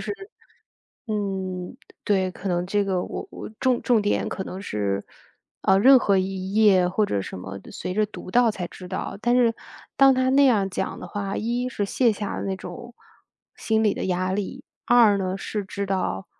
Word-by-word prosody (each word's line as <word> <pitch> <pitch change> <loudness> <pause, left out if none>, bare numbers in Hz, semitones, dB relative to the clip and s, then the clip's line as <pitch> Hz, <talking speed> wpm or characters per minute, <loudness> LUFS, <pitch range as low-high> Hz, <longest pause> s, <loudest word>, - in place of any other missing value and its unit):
是 - - -3 0.9
嗯， 190 -4 -3 0.3
对， 190 -2 +2
可 195 - -6
能 175 0 0
这 205 +2 +1
个 190 -2 0
我 - - -6
我 - - -8
重 255 -2 +2
重 235 -4 +3
点 205 - 0
可 190 - -4
能 185 - -7
是， 100 - -2 0.6
呃， 190 - +4
任 265 +7 +8
何 200 -5 +2
一 190 0 -3
页 200 -5 +5
或 205 +4 +1
者 100 - -1
什 - - -7
么 95 +1 -7
的， - - -14
随 180 - -5
着 215 +1 +2
读 200 -3 -10
到 245 -1 +5
才 185 -4 -4
知 180 +1 -11
道。 185 - -4
但 240 0 +3
是 235 -2 +3 0.4
当 270 0 +7
他 255 0 +1
那 280 +2 +5
样 215 -7 +3
讲 - - -3
的 - - -8
话， 195 +2 -4
一 240 +3 -1
是 210 -5 -2
卸 235 +4 +2
下 205 0 -4 0.2
那 190 -1 -2
种 185 +7 -9 0.6
心 220 0 +1
理 210 - +3
的 - - -3
压 185 0 0
力， 200 0 -4 0.2
二 230 -4 +6
呢， 190 -1 -2
是 205 +1 -4
知 200 +1 -4
道 185 - -2
195 Hz, 210 characters per minute, -24 LUFS, 185-220 Hz, 0.9 s, 任